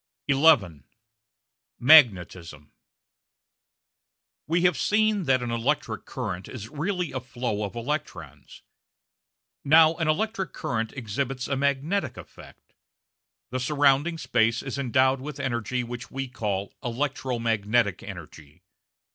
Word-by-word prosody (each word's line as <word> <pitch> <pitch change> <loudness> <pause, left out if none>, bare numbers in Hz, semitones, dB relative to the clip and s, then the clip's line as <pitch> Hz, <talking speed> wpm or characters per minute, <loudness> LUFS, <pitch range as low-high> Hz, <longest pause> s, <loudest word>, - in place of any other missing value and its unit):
§ - - +5
11 120 - +3 0.9
Magnetism 90 - +4 1.8
We 170 +3 +1
have 180 -2 +4
seen 210 +3 +1
that 130 -2 +2
an 120 - -3
electric 120 +6 -2
current 95 -8 -5
is 110 -3 -8
really 175 +4 -3
a 130 - -3
flow 120 -4 -4
of 100 +2 -5
electrons. 90 - -6 1.0
Now 160 +2 +6
an 165 -3 -1
electric 195 +4 -1
current 115 -2 -3
exhibits 130 +2 -3
a 140 - -1
magnetic 140 +3 -1
effect. - - -14 0.8
The 130 - -2
surrounding 145 +4 +2
space 115 -6 +1
is 135 0 -5
endowed 130 +1 +2
with 145 0 -7
energy 125 -1 -2
which 120 0 -7
we 135 0 -4
call 100 -5 -3
electro 130 +1 -2
magnetic 110 -3 0
energy. 75 +3 -11
130 Hz, 115 wpm, -26 LUFS, 110-150 Hz, 1.8 s, Now